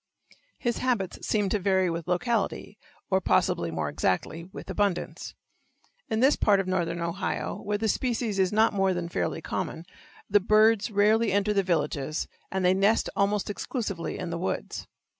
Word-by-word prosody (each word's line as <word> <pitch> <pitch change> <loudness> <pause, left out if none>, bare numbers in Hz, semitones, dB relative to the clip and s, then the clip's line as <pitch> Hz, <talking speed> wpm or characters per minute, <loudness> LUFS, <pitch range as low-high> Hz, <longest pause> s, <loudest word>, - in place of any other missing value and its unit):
His 240 -2 -1
habits 235 -8 -1
seem 210 -2 +1
to 210 - +1
vary 190 -1 +2
with 170 -1 -3
locality, 205 +3 -1 0.3
or 190 0 +3
possibly 85 - +1
more 80 -2 -2
exactly, 95 - -1
with 185 - -10
abundance. 195 -1 -2 0.7
In 220 +1 0
this 270 +3 +5
part 200 -2 +3
of 195 - 0
northern 175 -2 -1
Ohio, 170 +3 -3
where 205 0 -1
the 220 +1 -1
species 230 -2 -1
is 185 -1 +3
not 220 +1 +3
more 195 -2 +2
than 175 -1 -3
fairly 160 - -2
common, 165 - -4 0.4
the 205 +1 +4
birds 215 +2 +4
rarely 215 +1 +3
enter 205 +2 +2
the 200 - +3
villages, 155 -4 -1 0.2
and 190 -1 0
they 180 - +5
nest 200 +4 +2
almost 200 0 +1
exclusively 205 -4 -3
in 180 -2 -4
the 170 - -3
woods. 180 - -3
195 Hz, 165 wpm, -27 LUFS, 175-210 Hz, 0.7 s, this